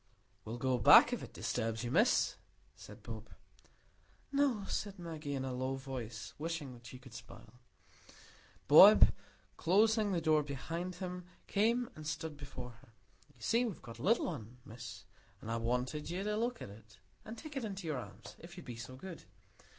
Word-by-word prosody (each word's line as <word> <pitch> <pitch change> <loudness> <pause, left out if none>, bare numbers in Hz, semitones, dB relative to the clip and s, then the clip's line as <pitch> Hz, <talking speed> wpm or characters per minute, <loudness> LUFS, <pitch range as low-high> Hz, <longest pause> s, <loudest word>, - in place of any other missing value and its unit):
"We'll 115 +2 -5
go 130 0 +1
back, - - +8
if - - -2
it - - -9
disturbs 115 -1 -2
you, 120 - -3
Miss," 215 - +3 0.4
said - - -13
Bob. - - -8 1.0
"No," 275 -7 +2
said 205 -1 -3
Maggie, 160 -5 -5
in 130 -1 -2
a 130 - -3
low 130 +1 -2
voice, 125 -5 -6
wishing 150 -6 -4
she 120 +1 -10
could 130 -1 -15
smile. 120 +1 -12 1.1
Bob, - - +9 0.5
closing 215 +4 +3
the 180 - +1
door 155 -2 +3
behind 165 +6 -4
him, 180 0 -6 0.2
came 230 +4 +2
and 155 -1 -8
stood 160 0 -4
before 140 -3 -8
her. 115 - -21 0.4
"You 120 - -23
see, 230 +2 +3
we've 225 -7 -4
got 115 -1 -10
a - - -7
little 230 0 +3
un, 125 -7 -7
Miss, 110 -4 -9 0.3
and 110 - -6
I 115 - 0
want'd 125 +6 -2
you 180 +3 -2
to 210 +1 -1
look 235 +2 -1
at 100 - -8
it, 110 +1 -16 0.3
and 225 +2 -8
take 310 -2 -9
it 270 - -2
in 205 -3 -4
your 155 -4 -2
arms, - - -10
if 175 +2 -12
you'd 180 - -9
be 120 -2 -7
so 120 +2 -8
good. 170 +5 -9
150 Hz, 180 wpm, -34 LUFS, 125-190 Hz, 1.1 s, Bob